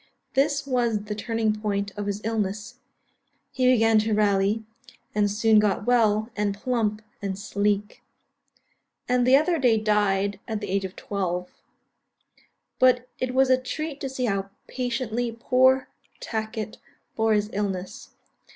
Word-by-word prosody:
This 285 Hz, +1 st, +1 dB
was 240 Hz, -5 st, 0 dB
the 210 Hz, 0 st, -4 dB
turning 220 Hz, +1 st, -1 dB
point 200 Hz, -1 st, -1 dB
of 205 Hz, -1 st, -4 dB
his 205 Hz, +1 st, -3 dB
illness; 210 Hz, -1 st, -3 dB, 0.7 s
he 255 Hz, -1 st, +3 dB
began 225 Hz, -2 st, +4 dB
to 215 Hz, 0 st, +1 dB
rally, 205 Hz, +1 st, +2 dB, 0.5 s
and 210 Hz, -1 st, +2 dB
soon 215 Hz, +1 st, +4 dB
got 210 Hz, -1 st, +1 dB
well, 220 Hz, -2 st, +2 dB
and 205 Hz, -1 st, 0 dB
plump, 215 Hz, -2 st, -1 dB, 0.2 s
and 195 Hz, -1 st, -3 dB
sleek; 205 Hz, 0 st, -1 dB, 1.1 s
and 250 Hz, 0 st, +2 dB
the 260 Hz, -, +7 dB
other 315 Hz, +4 st, +3 dB
day 245 Hz, -4 st, +4 dB
died 205 Hz, -2 st, +1 dB
at 220 Hz, -1 st, -2 dB
the 205 Hz, -3 st, -5 dB
age 195 Hz, 0 st, 0 dB
of 185 Hz, -, -7 dB
twelve. 180 Hz, -3 st, -3 dB, 1.3 s
But 250 Hz, -1 st, +4 dB
it 255 Hz, 0 st, -2 dB
was 265 Hz, 0 st, +4 dB
a 255 Hz, 0 st, +4 dB
treat 310 Hz, +2 st, -5 dB
to 270 Hz, -, -3 dB
see 260 Hz, -1 st, -2 dB
how 195 Hz, -3 st, -1 dB, 0.2 s
patiently 240 Hz, -2 st, -2 dB
poor 260 Hz, +2 st, +3 dB, 0.3 s
Tacket 220 Hz, -1 st, -4 dB, 0.4 s
bore 220 Hz, 0 st, +2 dB
his 210 Hz, +1 st, -1 dB
illness. 195 Hz, -2 st, -4 dB
220 Hz, 140 wpm, -25 LUFS, 205-245 Hz, 1.3 s, the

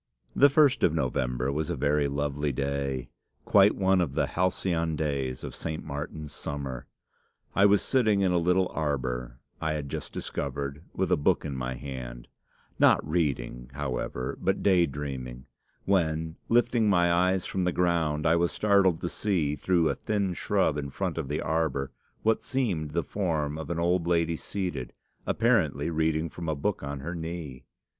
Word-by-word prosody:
"The 140 Hz, -, +7 dB
first 140 Hz, -1 st, +4 dB
of 80 Hz, -, +3 dB
November 65 Hz, -2 st, 0 dB
was 75 Hz, +2 st, -2 dB
a -, -, -1 dB
very 70 Hz, +1 st, +2 dB
lovely 70 Hz, +1 st, -1 dB
day, 70 Hz, -2 st, -2 dB, 0.3 s
quite 100 Hz, +1 st, +5 dB
one 95 Hz, -1 st, +3 dB
of 70 Hz, -6 st, -2 dB
the -, -, +2 dB
'halcyon 85 Hz, -3 st, 0 dB
days' 70 Hz, -4 st, -2 dB
of -, -, -6 dB
'St. 80 Hz, -1 st, -4 dB
Martin's 75 Hz, 0 st, -6 dB
summer.' 70 Hz, -3 st, -5 dB, 0.7 s
I 100 Hz, +1 st, +6 dB
was 100 Hz, 0 st, +4 dB
sitting 110 Hz, -6 st, +2 dB
in 95 Hz, -2 st, +3 dB
a 90 Hz, -, +3 dB
little 90 Hz, +2 st, +2 dB
arbour 65 Hz, -5 st, -2 dB, 0.2 s
I 80 Hz, 0 st, 0 dB
had 75 Hz, -2 st, -4 dB
just -, -, -5 dB
discovered, 70 Hz, +1 st, -4 dB
with 95 Hz, -2 st, 0 dB
a -, -, +5 dB
book 75 Hz, -, +2 dB
in 70 Hz, -, -3 dB
my 65 Hz, 0 st, -3 dB
hand, 65 Hz, -3 st, -7 dB, 0.5 s
not -, -, +5 dB
reading, 65 Hz, -7 st, -1 dB
however, 65 Hz, -2 st, -3 dB
but 95 Hz, +1 st, 0 dB
day 90 Hz, -4 st, +4 dB
dreaming, 65 Hz, -3 st, -6 dB, 0.4 s
when, 80 Hz, -4 st, +1 dB
lifting 120 Hz, -2 st, +3 dB
my 85 Hz, -3 st, +4 dB
eyes 90 Hz, +1 st, +2 dB
from 95 Hz, -2 st, -1 dB
the 90 Hz, -, +2 dB
ground, 85 Hz, -4 st, +1 dB
I 80 Hz, 0 st, +5 dB
was 85 Hz, 0 st, +1 dB
startled 100 Hz, -5 st, +3 dB
to 85 Hz, -, -2 dB
see, 85 Hz, -9 st, 0 dB
through 85 Hz, 0 st, +2 dB
a -, -, +2 dB
thin 100 Hz, -4 st, -1 dB
shrub 90 Hz, -5 st, +1 dB
in 70 Hz, -1 st, -4 dB
front 90 Hz, +3 st, -3 dB
of 75 Hz, -, -3 dB
the 75 Hz, +3 st, -2 dB
arbour, 80 Hz, -4 st, -1 dB, 0.3 s
what 110 Hz, 0 st, +2 dB
seemed 110 Hz, -, -1 dB
the 85 Hz, 0 st, +1 dB
form 80 Hz, -7 st, -1 dB
of 80 Hz, -, -6 dB
an 85 Hz, -, -2 dB
old 85 Hz, 0 st, +1 dB
lady 85 Hz, -1 st, +2 dB
seated, 90 Hz, -7 st, -4 dB, 0.3 s
apparently 75 Hz, +5 st, +2 dB
reading 80 Hz, 0 st, +1 dB
from 85 Hz, 0 st, -6 dB
a 80 Hz, -, 0 dB
book 95 Hz, +8 st, -1 dB
on 70 Hz, -1 st, -5 dB
her 85 Hz, +5 st, -4 dB
knee. 80 Hz, -6 st, -6 dB
80 Hz, 170 wpm, -28 LUFS, 70-90 Hz, 0.7 s, The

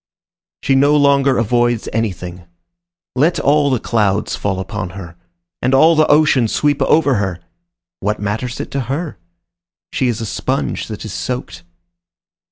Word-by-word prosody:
She 135 Hz, -, +2 dB
no 140 Hz, +2 st, +4 dB
longer 140 Hz, -2 st, +3 dB
avoids 120 Hz, 0 st, +1 dB
anything. 90 Hz, -5 st, -4 dB, 0.7 s
Let 155 Hz, +5 st, +2 dB
all 145 Hz, 0 st, +3 dB
the 130 Hz, -3 st, +1 dB
clouds 105 Hz, -3 st, 0 dB
fall 95 Hz, -2 st, -2 dB
upon 95 Hz, -1 st, -4 dB
her, 85 Hz, -3 st, -9 dB, 0.5 s
and 130 Hz, +2 st, +2 dB
all 160 Hz, +5 st, +6 dB
the 155 Hz, 0 st, +4 dB
ocean 145 Hz, -5 st, +4 dB
sweep 145 Hz, +5 st, 0 dB
over 140 Hz, -1 st, +3 dB
her! 95 Hz, -3 st, -2 dB, 0.6 s
What 105 Hz, +2 st, -2 dB
matters 110 Hz, +4 st, -3 dB
it -, -, -5 dB
to 140 Hz, -, -2 dB
her? 150 Hz, -, -3 dB, 0.7 s
She 130 Hz, -, +1 dB
is 120 Hz, -2 st, -1 dB
a 115 Hz, -, -3 dB
sponge -, -, -2 dB
that -, -, -7 dB
is -, -, -6 dB
soaked. 125 Hz, -8 st, -5 dB
125 Hz, 150 wpm, -17 LUFS, 105-140 Hz, 0.7 s, all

